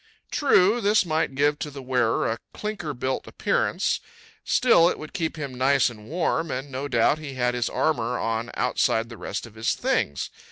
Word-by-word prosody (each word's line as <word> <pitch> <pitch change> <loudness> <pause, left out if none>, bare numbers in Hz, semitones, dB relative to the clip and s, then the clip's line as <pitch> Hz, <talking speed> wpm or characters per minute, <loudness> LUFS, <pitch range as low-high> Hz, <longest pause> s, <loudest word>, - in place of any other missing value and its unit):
True, 230 -5 +4
this 205 -1 +3
might 155 -4 0
give 145 +2 +2
to 150 - -4
the 140 -1 -9
wearer 125 -3 +1
a 115 - -2 0.2
clinker 195 -9 -4
built 130 +2 -2
appearance; - - 0 0.4
still 175 -9 +5
it - - -3
would 155 - -9
keep 165 -5 -2
him 140 -4 -5
nice 130 0 +3
and 105 -2 -13
warm, 165 0 0
and 135 +2 -4
no 135 +2 -3
doubt 130 +3 +2
he 145 -3 -7
had 125 -1 +1
his 120 -1 -1
armor 125 -6 0
on 115 +1 -2
outside 115 -2 +1
the 115 - -8
rest - - -4
of 115 - -13
his 110 +1 -1
things. 70 - -1
135 Hz, 190 wpm, -25 LUFS, 120-160 Hz, 0.4 s, still